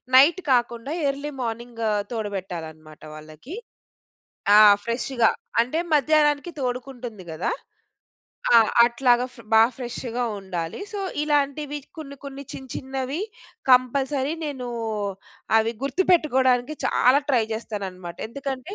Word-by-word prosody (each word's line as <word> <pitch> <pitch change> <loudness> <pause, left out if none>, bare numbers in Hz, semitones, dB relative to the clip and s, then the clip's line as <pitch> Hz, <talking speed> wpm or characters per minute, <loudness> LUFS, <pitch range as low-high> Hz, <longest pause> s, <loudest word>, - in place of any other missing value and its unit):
Night 295 +7 +7
కాకుండా 240 +1 +1 0.2
early 280 +2 -4
morning 235 0 -5 0.3
తోడబెట్టాలి 195 -7 -4
అన్నమాట 155 -1 -17
వాళ్ళకి. 155 - -10 1.0
ఆ! - - +9 0.3
ఫ్రెష్‌గా 235 0 +1 0.3
అంటే 255 +7 -2 0.2
మధ్యాహ్నానికి 295 +2 +3
తోడుకుంటుంది 245 -5 -5
గదా! 160 +2 -2 1.0
ఆ! - - +10 0.3
అట్లాగా 245 0 +3
ఫ - - -19 0.2
బా 220 - +8
ఫ్రెష్‌గా 245 -1 -4 0.2
ఉండాలి. 175 - -5
సో, 410 - -4 0.2
ఇలాంటివి 295 0 0 0.2
కొన్ని, 280 -3 -8
కొన్ని 275 0 -7
చిన్న, 265 -1 -9
చిన్నవి 265 +3 -4 0.5
కంపల్సరీ 265 +3 +3
నేను 260 -4 -5 0.9
అవి 225 +1 +1
గుర్తుపెట్టుకోడానికి 275 -4 +2
చాలా 260 +3 +4
ట్రై 250 -5 +3
చేస్తానన్నమాట. 190 -6 -6
ఎందుకంటే 275 - -5
250 Hz, 105 wpm, -24 LUFS, 225-280 Hz, 1.0 s, ఆ